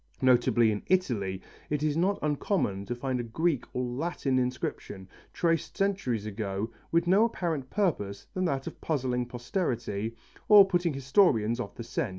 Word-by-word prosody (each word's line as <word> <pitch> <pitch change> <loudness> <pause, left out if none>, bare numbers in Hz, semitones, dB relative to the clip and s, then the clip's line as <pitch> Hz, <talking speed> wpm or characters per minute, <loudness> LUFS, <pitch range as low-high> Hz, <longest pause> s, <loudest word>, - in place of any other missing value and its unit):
Notably 120 -3 +4
in 105 - -3
Italy 105 - 0 0.3
it 150 0 -1
is 150 -1 +1
not 190 +5 +2
uncommon 145 - 0
to 120 - -2
find 130 0 -2
a - - -2
Greek 140 +4 0
or 125 - -2
Latin 130 +1 -1
inscription, 125 -6 -4 0.2
traced 165 -2 0
centuries 190 - 0
ago, 105 0 -3 0.2
with 170 +1 +3
no 195 +6 +5
apparent 165 - -2
purpose 105 - -1
than 185 0 -1
that 135 -5 -1
of - - -8
puzzling 125 -5 -1
posterity, 120 - -3 0.3
or 205 -2 +9
putting 175 -4 +1
historians 130 - +3
off 100 -5 -5
the 120 - -6
scent. 115 - -2
130 Hz, 160 wpm, -28 LUFS, 115-170 Hz, 0.3 s, or